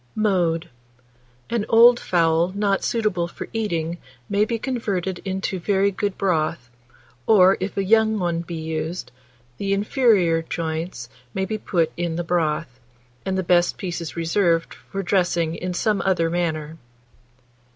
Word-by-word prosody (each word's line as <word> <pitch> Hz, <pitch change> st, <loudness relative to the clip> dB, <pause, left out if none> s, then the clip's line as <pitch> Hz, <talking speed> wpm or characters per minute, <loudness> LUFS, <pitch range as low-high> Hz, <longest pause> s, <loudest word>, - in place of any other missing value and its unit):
Mode. 180 Hz, -6 st, +1 dB, 0.8 s
An 235 Hz, -3 st, +1 dB
old 235 Hz, +1 st, +7 dB
fowl 165 Hz, 0 st, +2 dB
not 200 Hz, -1 st, +1 dB
suitable 210 Hz, -7 st, 0 dB
for -, -, -8 dB
eating 170 Hz, -6 st, -2 dB, 0.3 s
may 205 Hz, +1 st, +2 dB
be 230 Hz, +1 st, -2 dB
converted 200 Hz, -7 st, -2 dB
into 190 Hz, -1 st, -2 dB
very 200 Hz, +2 st, +2 dB
good 200 Hz, 0 st, -2 dB
broth, 155 Hz, -9 st, -1 dB, 0.6 s
or, 190 Hz, -3 st, +6 dB
if 190 Hz, +2 st, -4 dB
a 195 Hz, -, +1 dB
young 220 Hz, +2 st, +3 dB
one 175 Hz, -3 st, -1 dB
be 170 Hz, 0 st, -7 dB
used, 160 Hz, -2 st, -4 dB, 0.5 s
the 195 Hz, 0 st, 0 dB
inferior 200 Hz, -6 st, +3 dB
joints 160 Hz, -5 st, -4 dB, 0.3 s
may 190 Hz, -, 0 dB
be 215 Hz, +2 st, -3 dB
put 165 Hz, -5 st, 0 dB
in 170 Hz, -1 st, -2 dB
the 175 Hz, -, -2 dB
broth, 160 Hz, -6 st, -1 dB, 0.5 s
and 190 Hz, 0 st, 0 dB
the 190 Hz, -, 0 dB
best 175 Hz, 0 st, +2 dB
pieces 170 Hz, -3 st, -5 dB
reserved 170 Hz, 0 st, +1 dB
for 195 Hz, 0 st, -6 dB
dressing 175 Hz, -3 st, +1 dB
in 180 Hz, +2 st, -4 dB
some 200 Hz, +3 st, 0 dB
other 170 Hz, -4 st, +1 dB
manner. 160 Hz, -2 st, -2 dB
180 Hz, 140 wpm, -23 LUFS, 165-200 Hz, 0.8 s, old